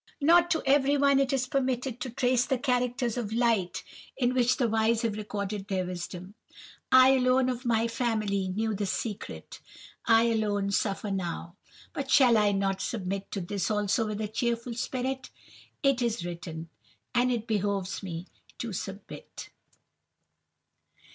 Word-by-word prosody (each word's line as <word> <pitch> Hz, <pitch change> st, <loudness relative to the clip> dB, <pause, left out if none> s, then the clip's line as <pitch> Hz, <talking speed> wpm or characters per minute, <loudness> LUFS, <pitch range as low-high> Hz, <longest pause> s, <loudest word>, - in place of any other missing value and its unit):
Not 340 Hz, +4 st, +5 dB
to 320 Hz, -, +1 dB
everyone 280 Hz, 0 st, +4 dB
is 270 Hz, -1 st, +1 dB
it 255 Hz, -, -18 dB
permitted 260 Hz, -3 st, -1 dB
to 260 Hz, -, -3 dB
trace 250 Hz, 0 st, +1 dB
the 265 Hz, -, +1 dB
characters 250 Hz, -2 st, 0 dB
of 220 Hz, -4 st, -3 dB
light 225 Hz, -6 st, +1 dB, 0.3 s
in 250 Hz, -1 st, +1 dB
which 250 Hz, -1 st, +2 dB
the 245 Hz, -, +2 dB
wise 225 Hz, +1 st, +1 dB
have 225 Hz, -3 st, 0 dB
recorded 205 Hz, -1 st, -4 dB
their 190 Hz, -2 st, -1 dB
wisdom. 180 Hz, +1 st, -6 dB, 0.6 s
I 260 Hz, 0 st, +8 dB
alone 255 Hz, 0 st, +3 dB
of 250 Hz, 0 st, -4 dB
my 230 Hz, -1 st, +2 dB
family 215 Hz, -5 st, -1 dB
knew 215 Hz, +4 st, -1 dB
the 205 Hz, 0 st, -2 dB
secret. 210 Hz, +1 st, -5 dB, 0.5 s
I 225 Hz, 0 st, +6 dB
alone 210 Hz, -3 st, 0 dB
suffer 200 Hz, 0 st, -1 dB
now. 175 Hz, -2 st, -4 dB, 0.4 s
But 275 Hz, -1 st, -4 dB
shall 250 Hz, -4 st, +6 dB
I 210 Hz, -1 st, +4 dB
not 195 Hz, -1 st, 0 dB
submit 195 Hz, -3 st, -3 dB
to 200 Hz, -, -2 dB
this 190 Hz, +2 st, -2 dB
also 210 Hz, +1 st, +1 dB
with 215 Hz, 0 st, -3 dB
a 215 Hz, -, -1 dB
cheerful 235 Hz, +2 st, -2 dB
spirit? 255 Hz, +2 st, -3 dB, 0.5 s
It 275 Hz, -2 st, +3 dB
is 230 Hz, -7 st, -1 dB
written, 165 Hz, -2 st, -6 dB, 0.4 s
and 250 Hz, +1 st, +3 dB
it 230 Hz, -3 st, -2 dB
behoves 200 Hz, -3 st, -1 dB
me 175 Hz, -3 st, -6 dB, 0.3 s
to 230 Hz, -4 st, -4 dB
submit. 195 Hz, +2 st, -8 dB
225 Hz, 150 wpm, -28 LUFS, 200-255 Hz, 0.6 s, I